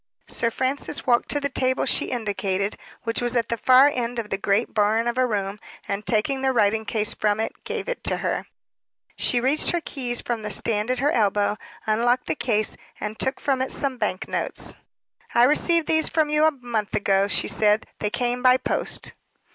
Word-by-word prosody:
Sir 230 - 0
Francis 260 +4 -1
walked 240 -2 +2
to 290 - +1
the 285 - -1
table 260 -1 0
she - - +1
indicated, 200 -4 -2 0.3
which 230 +1 -1
was 240 0 -1
at 230 -2 +1
the 235 - 0
far 255 +4 +6
end 240 -1 -3
of 225 -3 -4
the 195 - 0
great 200 +3 0
barn 220 +2 +2
of 240 - -1
a 255 0 +2
room, 200 -2 -2 0.3
and 200 +1 -3
taking 245 +4 +1
the 265 0 +2
writing 220 -2 +2
case 215 -1 +1
from 210 0 0
it, 225 - -4
gave - - -4
it - - -4
to - - +1
her. - - -2 0.7
She 245 - +1
reached 270 +5 +2
her 345 - +1
keys 245 -6 -2
from 235 -2 -3
the 210 - -4
stand 210 +2 0
at 255 - +1
her 280 +4 +1
elbow, 205 -2 +2 0.3
unlocked 240 +3 +1
the - - 0
case, 215 -7 0 0.2
and 210 +1 -5
took 265 - 0
from 270 -3 0
it 260 - -1
some 270 -3 -2
bank 185 - -2
notes. - - -2 0.6
"I 235 - +6
received 320 +5 +3
these 315 0 +2
from 310 -2 +1
you 300 +1 +4
a 315 - +5
month 240 -6 -3
ago," 195 -1 +2
she - - +1
said. 210 0 +2
"They 210 - -1
came 245 +2 -1
by 255 0 +6
post." 255 - -2
240 Hz, 205 wpm, -24 LUFS, 210-260 Hz, 0.7 s, far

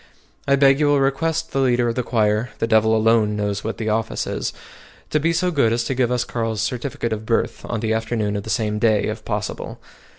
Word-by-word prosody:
I 140 - +5
beg 135 0 +4
you 150 - +3
will 145 -1 +3
request 160 +4 0
the 135 - -1
leader 125 -2 +2
of 115 - 0
the 125 - -1
choir 110 -1 +1
(the - - 0
devil 110 0 +3
alone 110 -1 +3
knows 105 -1 -2
what 110 - -4
the 110 -1 -2
office 110 - -1
is!) - - -3 0.6
to 155 - +2
be 165 +3 +1
so 180 +2 +1
good 140 -8 +2
as 115 +1 +1
to 135 - -2
give 125 -2 +1
us 125 -1 +1
Carl's 115 -3 -3
certificate 120 -2 -3
of 110 0 -5
birth 115 0 -1
on 115 -2 -3
the 110 -1 0
afternoon 110 -2 -1
of 100 - -2
the 110 - -9
same 105 0 0
day 110 -2 +3
if - - -4
possible. - - -4
115 Hz, 230 wpm, -21 LUFS, 110-135 Hz, 0.6 s, I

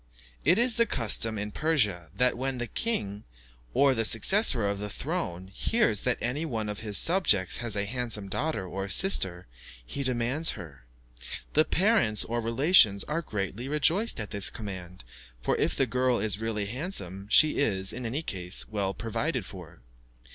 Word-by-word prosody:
It 170 +7 +4
is 240 0 +2
the 235 0 +3
custom 115 - +1
in 105 0 -4
Persia, 105 - -1
that 125 +4 +2
when 130 +1 -3
the 120 - -2
king, 105 - -3 0.5
or 140 - +3
the 115 -3 -1
successor 115 - +3
to 100 - 0
the 105 +1 -6
throne, 100 - -5
hears 115 - +1
that 125 -1 0
any 125 +7 -2
one 115 -9 -3
of 105 - -5
his 105 -3 -1
subjects 100 - +3
has 120 -4 -3
a 100 0 -1
handsome 115 -2 -2
daughter 145 0 -3
or 95 +2 -5
sister, 95 - +3 0.4
he 140 - -5
demands 130 +4 +2
her. 70 -7 -12 0.7
The 155 +1 +4
parents 185 - +3
or 120 +1 -3
relations 115 - +4
are 160 +3 -3
greatly 105 - -5
rejoiced 160 - +1
at 105 - -5
this 100 -2 0
command, 95 - -9 0.4
for - - -1
if - - 0
the 135 - +2
girl 125 +1 0
is 105 -2 0
really 110 -2 -2
handsome, 100 - -4
she 155 +6 +5
is, 95 -9 +1
in 125 - -6
any 130 +7 -3
case, 90 - -1
well 100 -3 -3
provided 115 -2 -3
for. - - -11
115 Hz, 170 wpm, -27 LUFS, 100-145 Hz, 0.7 s, she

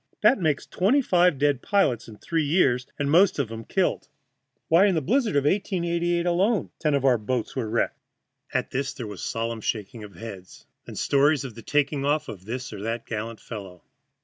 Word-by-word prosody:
That 270 - +5
makes 155 -5 0
twenty 245 +10 +2
five 180 - +3
dead 140 -2 +1
pilots 195 - +1
in 110 -2 -11
three 165 +6 -1
years, 140 -5 +2
and 145 -1 -1
most 180 +5 +5
of 135 -6 -1
'em 115 0 -6
killed. 180 -5 0 0.6
Why, 175 +5 +5
in 190 - +2
the - - +3
blizzard 225 - +1
of 140 - +3
1888 170 0 0
alone 190 +5 +1
ten 150 -3 +1
of 135 -1 0
our 125 -3 +4
boats 115 +2 -2
were 120 -5 -2
wrecked." 115 +1 -1 0.5
At - - -1
this 135 +1 -2
there 120 - -6
was 105 -4 -8
a - - -2
solemn 115 0 -3
shaking 110 +1 -4
of 100 -3 -11
heads, 95 -3 -10 0.2
then - - -9
stories 145 +1 +2
of 130 -4 -7
the 115 - -10
taking 145 +1 0
off 145 +2 0
of 95 -3 -9
this 125 +2 -5
or 100 - -7
that 115 +2 -3
gallant 115 0 -5
fellow. 95 -6 -9
140 Hz, 200 wpm, -25 LUFS, 115-170 Hz, 0.6 s, That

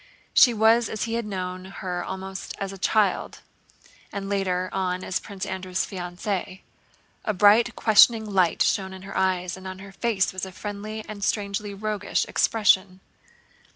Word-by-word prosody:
She 260 -3 +7
was 225 +1 +4
as 215 - -3
he 230 - -3
had 230 -2 -2
known 185 -2 -4
her 180 -2 -5
almost 190 0 -6
as 195 0 -4
a 195 - -10
child 205 0 +1 0.7
and 195 -1 -5
later 185 -2 0
on 185 -1 -1
as 185 - -1
Prince 195 -2 -7
Andrew's 185 -1 -2
fiancée. 185 +1 -4 0.6
A 215 - -1
bright 215 +5 +5
questioning 220 0 +5
light 190 -5 +2
shone 190 -1 0
in 190 0 -10
her 195 - -9
eyes, 185 -1 0
and 190 0 -9
on 185 0 -6
her 195 +1 -11
face 200 -2 0
was 185 - -5
a 190 - -4
friendly 210 +3 -6
and 205 -2 -7
strangely 200 0 -2
roguish 210 0 -1
expression. 190 -4 +2
195 Hz, 160 wpm, -25 LUFS, 185-210 Hz, 0.7 s, She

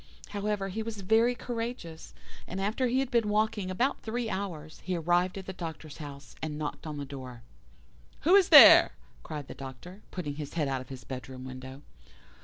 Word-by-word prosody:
However, 205 -1 -2
he 215 +4 -3
was 220 -2 -5
very 225 +5 +3
courageous, 230 -9 -6 0.3
and 190 - -5
after 215 +6 0
he 255 +2 +2
had 270 - -3
been 230 -4 +2
walking 210 -2 0
about 245 +9 0
three 230 0 -3
hours, 165 -6 -5
he 185 - -2
arrived 175 +3 +1
at 190 - -7
the 190 - -6
Doctor's 160 -4 -7
house, 140 -2 -9
and 150 -1 -4
knocked 155 +2 -5
at 150 -1 -5
the 145 - -4
door. 130 -4 -9 0.8
"'Who 340 +6 +4
is 395 -2 +6
there?' - - +10 0.3
cried 150 -3 -7
the - - -7
Doctor, 135 - -10
putting 150 -6 -5
his 150 0 -6
head 155 -4 +1
out 135 -1 -1
of 130 - -12
his 130 -2 -8
bedroom 130 0 -7
window. 130 +2 -9
180 Hz, 190 wpm, -29 LUFS, 145-215 Hz, 0.8 s, there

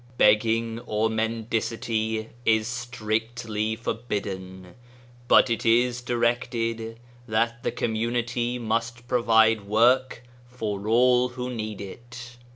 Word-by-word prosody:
Begging 115 +2 +3
or 110 +1 +1
mendicity 110 0 -2
is 110 -1 +2
strictly 115 -2 -2
forbidden, 95 -6 -5 0.5
but 130 - +6
it 115 - -1
is 120 +2 +3
directed 115 -1 -1 0.3
that 115 +1 0
the - - -1
com 115 -1 -2
munity 120 +2 -1
must 115 +2 -2
provide 115 -4 +3
work 120 +3 +3 0.2
for 105 -5 -4
all 125 +2 +4
who 125 0 -5
need 110 -4 -5
it. 120 +4 -10
115 Hz, 105 wpm, -25 LUFS, 110-120 Hz, 0.5 s, but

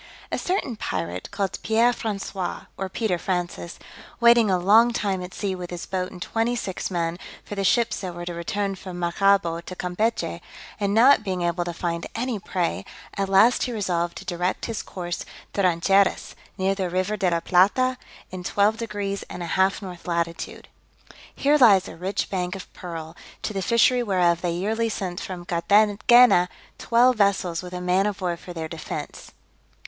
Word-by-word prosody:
A - - 0
certain 360 - -1
pirate 90 - -4
called 200 -2 -3
Pierre 230 +2 +3
François, 195 -5 -4
or 190 0 -4
Peter 190 -3 -1
Francis, 175 -1 -3 0.4
waiting 235 -2 +6
a 185 - +3
long 215 +7 +5
time 200 -5 -1
at 180 0 -7
sea 195 -1 -3
with 180 -1 -6
his 175 -1 -6
boat 185 -1 -3
and 180 - -10
twenty 225 +6 -1
six 190 -6 -4
men, 170 -1 -2 0.3
for - - -7
the 200 -1 -2
ships 235 +4 +2
that 180 -3 -5
were 175 0 -6
to 175 - -4
return 195 +4 -2
from 185 -1 -8
Maracaibo 175 -1 +2
to 185 +2 -9
Campechy, 180 - -2 0.4
and 200 0 0
not 245 +1 +6
being 185 -3 -2
able 175 +1 0
to 175 - -3
find 170 0 -3
any 235 -2 -2
prey, 175 - -2 0.3
at 195 -1 -1
last 210 +6 +5
he 250 - -3
resolved 175 -6 -1
to 195 - -9
direct 180 0 -2
his 230 -2 -3
course 175 -2 -5 0.3
to 200 - 0
Rancheiras, 190 +2 +2 0.2
near 190 +1 +1
the 190 -2 -2
River 185 +4 -1
de 190 -3 +1
la 170 -1 +1
Plata, 205 +10 +3 0.3
in 185 -1 -6
12 205 +4 +2
deg. 230 -2 -6 0.3
and 180 - -6
a 170 - -3
half 190 +2 +2
north 180 -2 -9
latitude. 170 -1 -3 0.7
Here 295 +2 +3
lies 200 -7 +6
a - - -9
rich 185 +4 -2
bank 180 -1 -2
of 195 - -10
pearl, 165 -2 -7 0.3
to 215 - -2
the 195 - -2
fishery 235 +4 +3
whereof 180 -6 +2
they 175 -2 -1
yearly 220 +6 -1
sent 185 -4 -4
from 180 -2 -6
Carthagena 205 +3 +5 0.3
twelve 245 +1 +4
vessels 195 -4 +1
with 180 0 -9
a 180 - -4
man 180 +3 +2
of 205 -2 -3
war 180 -2 -1
for 175 +1 -11
their 165 -2 -5
defence. 160 0 -7
190 Hz, 185 wpm, -24 LUFS, 175-210 Hz, 0.7 s, waiting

